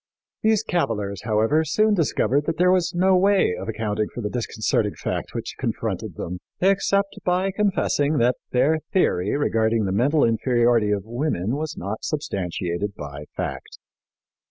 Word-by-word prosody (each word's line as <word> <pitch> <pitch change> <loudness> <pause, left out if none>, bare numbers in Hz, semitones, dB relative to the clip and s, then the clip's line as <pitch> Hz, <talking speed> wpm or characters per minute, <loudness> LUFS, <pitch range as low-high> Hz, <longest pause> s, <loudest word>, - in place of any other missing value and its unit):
" - - -70
These 220 -1 +3
cavillers, 105 - -2
however, 115 +8 +2
soon 215 +6 +2
discovered 145 - +1
that 165 - -1
there 180 +1 +4
was 180 -3 +2
no 185 +2 +4
way 195 - +3
of 95 +4 -6
accounting 105 -1 -1
for 120 - -6
the 105 -2 -3
disconcerting 110 -3 -1
fact - - -4
which - - -4
confronted - - -3
them, 90 +1 -5 0.2
except 195 +1 +1
by 185 +2 +1
confessing 185 -7 +1
that 120 +1 +2
their 150 +5 +2
theory 105 - +2
regarding 115 -5 +1
the 95 - -1
mental 135 +10 +2
inferiority 120 -1 +2
of 100 -2 0
women 120 - -1
was 155 +1 -4
not 100 +4 -5
substantiated 95 - -3
by 75 0 -8
fact. - - -5
120 Hz, 155 wpm, -23 LUFS, 105-170 Hz, 0.2 s, there